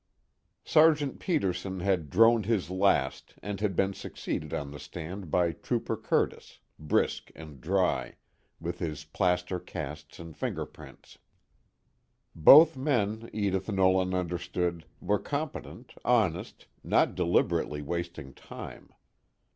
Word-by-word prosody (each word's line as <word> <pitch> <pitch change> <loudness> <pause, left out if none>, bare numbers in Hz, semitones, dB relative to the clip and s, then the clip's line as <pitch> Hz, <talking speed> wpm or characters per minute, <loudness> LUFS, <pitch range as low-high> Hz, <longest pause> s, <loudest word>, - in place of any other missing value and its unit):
III - - -48
Sergeant 155 -3 +4
Peterson 95 - -1
had 90 -5 0
droned 115 - +4
his 105 -6 0
last 95 -8 +1
and 100 0 -4
had 100 -4 0
been 95 +2 +1
succeeded 75 -4 -5
on 70 -1 -4
the 75 - -9
stand 90 +2 -7
by 85 +1 +2
Trooper 80 - -2
Curtis, - - -1 0.2
brisk 75 -1 0
and 75 -5 -11
dry, 95 +3 0 0.4
with 85 +1 -5
his 75 -3 -4
plaster 90 +2 0
casts 75 -2 -8
and 85 -2 -10
fingerprints. - - -7 1.1
Both 150 - +8
men, 115 -5 -1
Edith 100 -1 -1
Nolan 95 -1 +2
understood, 90 -1 -2
were 105 -1 0
competent, 145 0 -5
honest, - - 0 0.2
not - - +2
deliberately 85 -4 0
wasting 85 -3 -5
time. - - -10
90 Hz, 115 wpm, -29 LUFS, 85-105 Hz, 1.1 s, Both